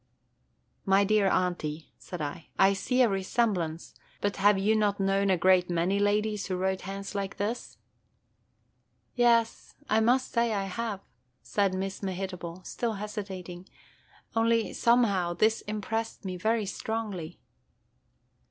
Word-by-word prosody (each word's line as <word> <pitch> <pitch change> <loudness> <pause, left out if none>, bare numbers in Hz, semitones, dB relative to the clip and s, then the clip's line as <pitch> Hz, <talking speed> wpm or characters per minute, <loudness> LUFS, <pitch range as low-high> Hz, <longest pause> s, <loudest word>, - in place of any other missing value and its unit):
"My 195 +1 +4
dear 210 0 +3
Aunty," 165 -4 -1
said 180 -3 -7
I, 150 +3 -6
"I 195 +1 +5
see 250 +6 +2
a - - +5
resemblance; 190 -5 -1 0.3
but 205 0 -1
have 200 +1 +5
you 205 +3 +2
not 205 -2 +1
known 195 0 +2
a 185 - +3
great 185 0 +4
many 175 +3 +1
ladies 210 0 +1
who 185 - -2
wrote 190 +1 -1
hands 195 +1 -6
like 200 -1 -3
this?" 215 +4 -3 1.4
"Yes, 235 -2 +2
I 215 - +3
must 250 +4 +2
say 235 -2 +1
I 200 - 0
have," 205 +1 -4 0.4
said 200 -2 0
Miss 190 +1 -4
Mehitable, 185 -2 -5
still 235 -2 -2
hesitating, 190 -3 -6 0.3
– - - -30
"only, 230 0 +2
somehow, 200 -8 +2
this 220 +5 +2
impressed 220 +1 -3
me 185 -1 -3
very 220 +4 0
strongly." 200 -5 -4
200 Hz, 135 wpm, -28 LUFS, 185-220 Hz, 1.4 s, I